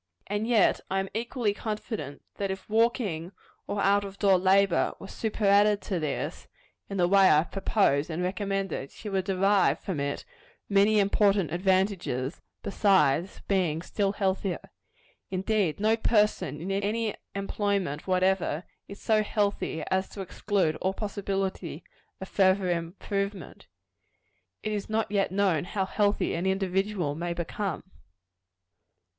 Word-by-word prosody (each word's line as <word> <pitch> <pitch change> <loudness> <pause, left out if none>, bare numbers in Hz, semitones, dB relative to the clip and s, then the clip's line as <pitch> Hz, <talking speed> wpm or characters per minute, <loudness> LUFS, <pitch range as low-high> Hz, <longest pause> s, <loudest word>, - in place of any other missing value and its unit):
And 205 +2 -2
yet 230 -5 +4
I 195 - 0
am 195 0 -3
equally 230 -1 -1
confident, 210 - -5
that 200 -1 -2
if 190 0 -5
walking, 215 -6 0 0.3
or 205 - -2
out 200 +1 +4
of 200 0 -8
door 195 -3 +4
labor, 190 -1 +3
were - - -10
superadded 205 -1 +2
to 185 -4 -2
this, 155 -2 -3 0.4
in 195 - -4
the 175 -1 +3
way 195 0 +6
I - - +6
have 155 - 0
proposed 190 -7 +1
and 170 +2 -2
recommended, 195 -5 -2
she 210 - -8
would 190 -2 -1
derive 195 +1 +3
from 180 -7 -4
it 140 0 -3 0.4
many 205 +2 +4
important 200 -3 +3
advantages, 185 -6 0 0.2
besides 190 -4 +2
being 175 -5 +1
still 200 +1 -1
healthier. 195 -2 -2 0.6
Indeed, 190 -3 0
no 215 +2 +3
person, 210 -8 +1
in 180 +4 -4
any 210 +3 0 0.2
employment 200 -6 -1
whatever, 185 -3 +1 0.2
is 200 - -10
so 215 -1 +2
healthy 205 -6 -1
as 190 0 +1
to 200 - -7
exclude 190 -3 0
all 190 +1 -1
possibility 195 -5 -3 0.4
of 190 - -6
further 190 -1 +3
improvement. 195 +4 -4 1.0
It 215 - -2
is 210 -1 -3
not 220 -1 -1
yet 200 -3 +1
known 190 -6 +2
how 190 +1 -1
healthy 205 +1 +1
an 175 +3 -1
individual 190 -3 0
may 170 +3 -3
become. 175 +2 -3
195 Hz, 140 wpm, -28 LUFS, 180-205 Hz, 1.0 s, way